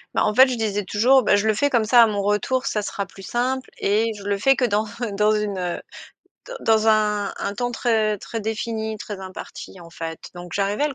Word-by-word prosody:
Bah - - +2
en 210 - +1
fait, 260 +4 +7
je 255 - -2
disais 210 -3 -1
toujours: 250 +8 +4
«Bah, 205 - +4
je 205 +1 +1
le 220 - +4
fais 285 +7 +1
comme 235 -5 +2
ça 240 +2 +6
à 230 - +7
mon 205 -2 -2
retour 210 +6 0
ça 210 - -1
sera 200 -1 -4
plus 195 0 -14
simple 255 +6 -2
et 220 +3 +1
je 200 - -10
le 200 0 -1
fais 270 +6 +4
que 255 - +1
dans 215 -1 +1 0.3
dans 210 +1 +3
une, 210 -2 -1
heu, 180 -1 -3 0.7
d - - -7
dans 220 0 +3
un 210 -2 +1
un 200 - -3
temps 245 +2 -2
très, 220 -3 +1
très 225 +3 -6
défini, 220 0 -3
très 205 -1 -7
imparti.», 190 0 -9
en 170 - -13
fait. 165 -1 -7
Donc 175 -1 -9
j'arrivais 200 +7 0
à - - +2
le 280 - -7
215 Hz, 240 wpm, -22 LUFS, 200-235 Hz, 0.7 s, fait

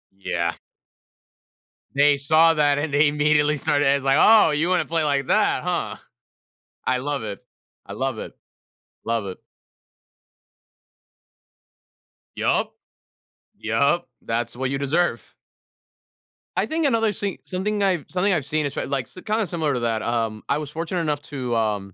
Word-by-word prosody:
Yeah. 85 -3 -2 1.4
They 145 0 +4
saw 160 +4 +4
that, 145 -2 +2
and 145 -1 -3
they 145 +1 +5
immediately 150 0 +2
started 145 0 +1
as 140 0 +2
like, 135 +1 +3
"Oh, 215 -7 +6
you 155 +4 +1
wanna 185 - +2
play 165 -1 0
like 140 -2 0
that, - - +2
huh?" - - -2 0.9
I 130 0 +2
love 145 0 -3
it. 105 +2 -6 0.4
I - - -9
love 130 -4 -2
it. - - -7 0.7
Love 115 -3 -1
it. 95 - -7 3.0
Yup. - - 0 0.8
Yup. 140 +9 +1
That's 115 +1 -2
what 130 +1 -2
you 140 - -1
deserve. 165 +6 -1 1.3
I - - +2
think 315 -1 0
another 225 -4 +2
see 200 -1 -3
something 205 +3 -2
I've 180 -7 +1
something 185 +2 +1
I've 160 -6 0
seen 150 +1 -1
is, 140 - -3
pr - - -3
like, 135 -3 -2
s - - -15
kinda 215 0 0
similar 160 -6 -1
to 125 - -2
that. 115 -2 0
Um, 115 -2 -2
I 140 - +2
was 150 -1 -5
fortunate 170 +2 -3
enough 150 -2 -1
to, 125 -4 -2
um, 105 -4 -1
145 Hz, 150 wpm, -23 LUFS, 125-165 Hz, 3.0 s, Oh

